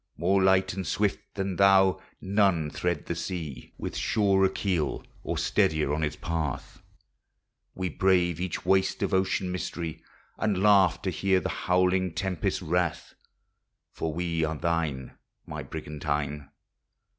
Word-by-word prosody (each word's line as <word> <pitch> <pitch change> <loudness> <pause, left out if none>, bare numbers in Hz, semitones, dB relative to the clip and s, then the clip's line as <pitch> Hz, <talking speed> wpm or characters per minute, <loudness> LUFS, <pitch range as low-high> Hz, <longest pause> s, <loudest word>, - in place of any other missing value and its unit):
More 95 +4 +2
light 95 -1 +3
and 95 0 -4
swift 105 -1 -1
than 95 -2 -2
thou 95 -1 +5 0.2
none 95 -6 +2
thread 85 -4 -2
the - - -2
sea 80 -6 -5
With - - -5
surer 95 -3 +2
keel 95 -5 -1 0.2
or - - -3
steadier 75 -2 +1
on 75 - -1
its 75 -1 -1
path, 80 -6 -4 0.9
We 95 -1 -2
brave 90 -1 +2
each 90 -2 -3
waste 95 0 +2
of - - -1
ocean 95 -1 +1
mystery 85 -3 -4 0.4
And 100 -3 0
laugh 100 -4 +5
to - - 0
hear 95 -1 +2
the - - -3
howling 90 -1 +1
tempest's 95 -5 -1
wrath, 85 0 -1 0.8
For 80 - -3
we 85 0 -1
are 80 0 -1
thine. 80 -6 -2 0.3
My - - -6
origan 75 0 -7
tine! 75 -1 -2
90 Hz, 140 wpm, -27 LUFS, 80-95 Hz, 0.9 s, thou